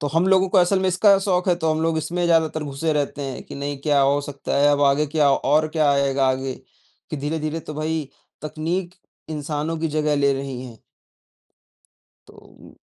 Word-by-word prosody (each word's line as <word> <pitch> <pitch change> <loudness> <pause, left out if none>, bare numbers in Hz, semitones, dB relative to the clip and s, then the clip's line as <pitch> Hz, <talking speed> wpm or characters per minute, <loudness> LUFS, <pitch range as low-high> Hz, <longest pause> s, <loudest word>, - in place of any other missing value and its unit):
तो 145 - -2
हम 165 +4 +1
लोगों 190 0 +4
को 190 - +3
असल 180 +2 +3
में 190 - +1
इसका 195 +2 +4
शौक 190 -1 0
है 180 - +4
तो 160 - +2
हम 155 - 0
लोग 165 -1 +1
इसमें 175 +3 -2
ज़्यादातर 160 -2 +2
घुसे 145 +3 -2
रहते 145 0 -2
हैं 135 -2 -5
कि - - -10
नहीं 140 0 -4
क्या 145 -1 +2
हो 140 +1 +3
सकता 140 -1 -4
है 145 +1 +4
अब 145 - 0
आगे 140 +2 +3
क्या 150 -1 +2
और 150 +3 +2
क्या 155 -2 +2
आएगा 140 -1 +1
आगे, 130 0 -2 0.6
कि - - -3
धीरे-धीरे 155 +2 -3
तो 155 - -8
भई, 155 -1 -3 0.3
तकनीक 165 +4 -3 0.4
इंसानों 150 +1 -3
की 165 - -1
जगह 150 0 0
ले 140 -1 +3
रही 135 -2 -5
है। 115 -3 -12 1.5
तो - - -16
उम - - -17
150 Hz, 200 wpm, -22 LUFS, 140-165 Hz, 1.5 s, लोगों